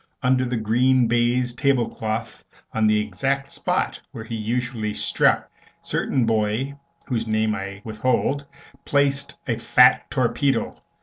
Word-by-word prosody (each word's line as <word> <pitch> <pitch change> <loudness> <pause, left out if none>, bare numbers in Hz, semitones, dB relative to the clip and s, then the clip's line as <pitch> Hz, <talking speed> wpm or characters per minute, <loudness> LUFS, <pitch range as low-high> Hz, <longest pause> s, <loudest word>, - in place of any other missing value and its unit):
Under 130 0 +3
the 125 -1 -2
green 125 +4 +3
baize 120 +1 +1
table 130 -2 +1
cloth, 110 0 -4 0.3
on 110 -1 +2
the 105 0 +3
exact 135 +7 -2
spot - - -1
where 110 - -7
he 115 - -8
usually 115 -1 -2
struck, - - +2 0.3
certain 130 -3 -1
boy, 110 +4 0 0.3
whose 115 -3 -2
name 110 0 +1
I 100 -1 -6
withhold, 130 +5 -1 0.4
placed 140 0 0
a 115 -2 -1
fat 125 +2 +5
torpedo. 135 +2 0
120 Hz, 130 wpm, -23 LUFS, 110-130 Hz, 0.4 s, fat